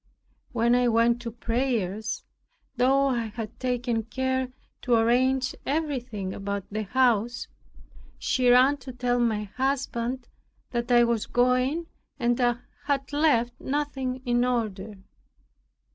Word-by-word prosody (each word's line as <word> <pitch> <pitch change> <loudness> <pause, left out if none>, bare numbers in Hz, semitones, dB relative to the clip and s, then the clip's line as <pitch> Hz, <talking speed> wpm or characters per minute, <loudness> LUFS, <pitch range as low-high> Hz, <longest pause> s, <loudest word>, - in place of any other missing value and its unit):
When 235 0 +2
I 245 0 +4
went 235 +1 +3
to 235 -1 -5
prayers, 230 -3 -2 0.5
(though 270 +3 +3
I 240 -3 0
had 220 0 -7
taken 245 -2 0
care 260 +2 -2 0.3
to 245 -2 +2
arrange 255 +3 +2
everything 250 -10 -2
about 200 -1 -4
the 215 +1 -2
house) 240 0 +1 0.7
she 255 -1 +1
ran 255 +4 +6
to 260 -1 -9
tell 245 0 0
my 220 -3 +1
husband 255 +1 -2 0.4
that 240 0 -2
I 240 0 +7
was 235 -2 0
going 255 +6 +2 0.3
and 240 -2 +1 0.5
had 280 -1 -1
left 245 -6 +3
nothing 265 -2 -2
in 240 0 +2
order. 215 -4 -2
245 Hz, 120 wpm, -26 LUFS, 230-260 Hz, 0.7 s, I